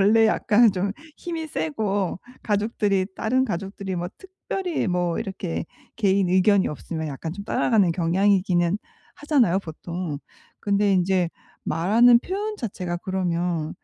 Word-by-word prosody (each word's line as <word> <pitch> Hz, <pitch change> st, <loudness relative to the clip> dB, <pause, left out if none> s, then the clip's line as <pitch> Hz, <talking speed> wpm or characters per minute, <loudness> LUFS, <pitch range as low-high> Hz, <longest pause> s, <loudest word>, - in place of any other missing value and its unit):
원래 220 Hz, +3 st, +5 dB
약간 220 Hz, +1 st, +4 dB
좀 195 Hz, +1 st, -1 dB, 0.2 s
힘이 330 Hz, -2 st, -5 dB
세고 195 Hz, -, -2 dB, 0.2 s
가족들이 205 Hz, -2 st, 0 dB
다른 255 Hz, +4 st, +1 dB
가족들이 195 Hz, -2 st, -4 dB
뭐 175 Hz, 0 st, -3 dB
특별히 380 Hz, -, -4 dB
뭐 175 Hz, -2 st, 0 dB
이렇게 190 Hz, -3 st, -4 dB, 0.3 s
개인 195 Hz, -3 st, +2 dB
의견이 190 Hz, +2 st, +4 dB
없으면 160 Hz, +1 st, -5 dB
약간 150 Hz, +3 st, -5 dB
좀 200 Hz, +3 st, -8 dB
따라가는 205 Hz, -5 st, +2 dB
경향이기는 180 Hz, +1 st, +2 dB, 0.4 s
하잖아요, 260 Hz, -, +2 dB
보통. 170 Hz, -2 st, -5 dB, 0.4 s
근데 200 Hz, 0 st, +2 dB
인제 180 Hz, -1 st, +2 dB, 0.3 s
말하는 230 Hz, +8 st, +5 dB
표현 415 Hz, -, -3 dB
자체가 180 Hz, -, -4 dB
그러면 175 Hz, -4 st, -2 dB
195 Hz, 295 characters per minute, -24 LUFS, 175-220 Hz, 0.4 s, 원래